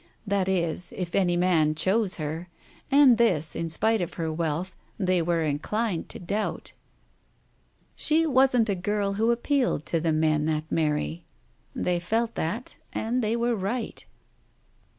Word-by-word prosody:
That 200 Hz, -2 st, 0 dB
is, 175 Hz, -2 st, -1 dB
if 180 Hz, -2 st, -4 dB
any 175 Hz, -3 st, +2 dB
man 165 Hz, -4 st, +2 dB
chose 190 Hz, +5 st, +2 dB
her, 160 Hz, +3 st, -5 dB, 0.4 s
and 275 Hz, -4 st, +6 dB
this, 160 Hz, -10 st, +2 dB
in 165 Hz, -, -3 dB
spite 220 Hz, +6 st, +1 dB
of 175 Hz, -, -4 dB
her 160 Hz, -2 st, -2 dB
wealth, 165 Hz, +3 st, -2 dB, 0.2 s
they 185 Hz, -3 st, +1 dB
were 165 Hz, 0 st, 0 dB
inclined 170 Hz, +6 st, -2 dB
to -, -, -6 dB
doubt. 200 Hz, +5 st, -3 dB, 1.2 s
She 320 Hz, +2 st, +3 dB
wasn't 260 Hz, -5 st, +4 dB
a 200 Hz, -, +1 dB
girl 200 Hz, +2 st, -1 dB
who 220 Hz, +3 st, +1 dB
appealed 245 Hz, -, 0 dB
to 165 Hz, -, 0 dB
the 165 Hz, 0 st, 0 dB
men 155 Hz, -1 st, +1 dB
that 155 Hz, 0 st, -2 dB
marry. 150 Hz, -, -1 dB, 0.5 s
They 175 Hz, -1 st, 0 dB
felt 225 Hz, +6 st, -1 dB
that, 210 Hz, +11 st, -3 dB
and 235 Hz, +3 st, -1 dB
they 220 Hz, +2 st, +1 dB
were 235 Hz, 0 st, 0 dB
right. 220 Hz, +5 st, -3 dB
185 Hz, 150 wpm, -26 LUFS, 160-225 Hz, 1.2 s, and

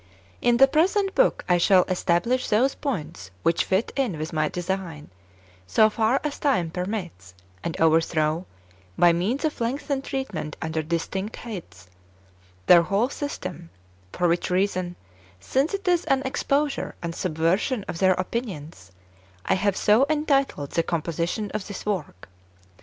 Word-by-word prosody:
2. -, -, -1 dB
In 240 Hz, 0 st, +5 dB
the 270 Hz, +2 st, +7 dB
present 385 Hz, +7 st, +2 dB
book, -, -, +2 dB
I 180 Hz, -1 st, +3 dB
shall 185 Hz, +1 st, +5 dB
establish 185 Hz, +7 st, 0 dB
those 250 Hz, +6 st, +3 dB
points 155 Hz, -, -5 dB
which 165 Hz, -, +2 dB
fit 190 Hz, +4 st, 0 dB
in 250 Hz, -, 0 dB
with 155 Hz, +2 st, -5 dB
my 155 Hz, -1 st, +1 dB
design, 175 Hz, -, -4 dB, 0.6 s
so 215 Hz, -, +4 dB
far 225 Hz, +5 st, +2 dB
as 300 Hz, -1 st, -3 dB
time 185 Hz, -, +1 dB
permits, 180 Hz, -, -5 dB, 0.3 s
and 165 Hz, -, -4 dB
overthrow, 160 Hz, +1 st, +2 dB, 0.5 s
by 175 Hz, -1 st, +6 dB
means 220 Hz, -, -1 dB
of 300 Hz, -5 st, -2 dB
lengthened 270 Hz, +3 st, -2 dB
treatment 265 Hz, -, -4 dB
under 160 Hz, 0 st, -2 dB
distinct 170 Hz, +6 st, -3 dB
heads, 90 Hz, -, -9 dB, 0.8 s
their 175 Hz, -1 st, +8 dB
whole 200 Hz, +9 st, +1 dB
system; 185 Hz, -, -6 dB, 0.4 s
for 180 Hz, -, +1 dB
which 170 Hz, +1 st, 0 dB
reason, 185 Hz, -1 st, 0 dB, 0.4 s
since 270 Hz, -, 0 dB
it 395 Hz, -1 st, -7 dB
is 355 Hz, -1 st, +3 dB
an 270 Hz, 0 st, +2 dB
exposure 280 Hz, +2 st, -1 dB
and 170 Hz, 0 st, -3 dB
subversion 180 Hz, -, 0 dB
of 165 Hz, -, -5 dB
their 185 Hz, -1 st, +5 dB
opinions, 180 Hz, -, -5 dB, 0.5 s
I -, -, +2 dB
have 195 Hz, +1 st, +1 dB
so 225 Hz, +7 st, +4 dB
entitled 275 Hz, -, +1 dB
the 165 Hz, -, +2 dB
composi 170 Hz, 0 st, -2 dB
tion 210 Hz, 0 st, -3 dB
of 215 Hz, -2 st, -4 dB
this 200 Hz, -3 st, -7 dB
work. 190 Hz, -, -4 dB
190 Hz, 150 wpm, -25 LUFS, 165-255 Hz, 0.8 s, their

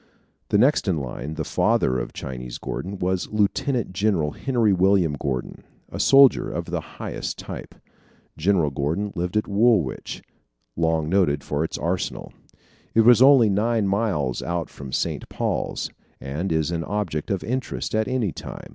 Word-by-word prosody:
The -, -, +3 dB
next 130 Hz, +2 st, +3 dB
in 90 Hz, -4 st, +1 dB
line, 70 Hz, +2 st, -5 dB
the 80 Hz, -, -3 dB
father 65 Hz, -3 st, +1 dB
of -, -, -5 dB
Chinese 65 Hz, -2 st, -6 dB
Gordon, 95 Hz, +3 st, -5 dB
was 90 Hz, 0 st, -1 dB
Lieutenant 110 Hz, +2 st, 0 dB
General 95 Hz, -7 st, +1 dB
Henry 120 Hz, -, +1 dB
William 95 Hz, -3 st, +3 dB
Gordon, 70 Hz, -3 st, -4 dB, 0.3 s
a -, -, -6 dB
soldier 135 Hz, -1 st, +6 dB
of -, -, -4 dB
the -, -, -2 dB, 0.2 s
highest -, -, -4 dB
type. -, -, -8 dB, 0.6 s
General 85 Hz, -2 st, +2 dB
Gordon 80 Hz, +9 st, -2 dB
lived 90 Hz, +3 st, -2 dB
at 105 Hz, -, 0 dB
Woolwich, 100 Hz, -, +1 dB, 0.5 s
long 80 Hz, -2 st, +1 dB
noted 80 Hz, -6 st, +2 dB
for 75 Hz, +1 st, -1 dB
its 80 Hz, -, -3 dB
arsenal. 90 Hz, +1 st, -3 dB, 0.6 s
It 115 Hz, 0 st, +5 dB
is 120 Hz, -1 st, +7 dB
only 130 Hz, -6 st, +7 dB
nine 110 Hz, +1 st, +1 dB
miles 95 Hz, -, 0 dB
out 85 Hz, -1 st, -3 dB
from 70 Hz, -2 st, -9 dB
St. -, -, -2 dB
Paul's, -, -, -2 dB, 0.3 s
and 75 Hz, +8 st, -4 dB
is 80 Hz, 0 st, +1 dB
an 85 Hz, -1 st, -2 dB
object 90 Hz, -7 st, -3 dB
of 100 Hz, -2 st, -1 dB
interest 130 Hz, +3 st, -3 dB
at 110 Hz, 0 st, +1 dB
any 125 Hz, -7 st, 0 dB
time. -, -, -9 dB
95 Hz, 155 wpm, -24 LUFS, 75-105 Hz, 0.6 s, is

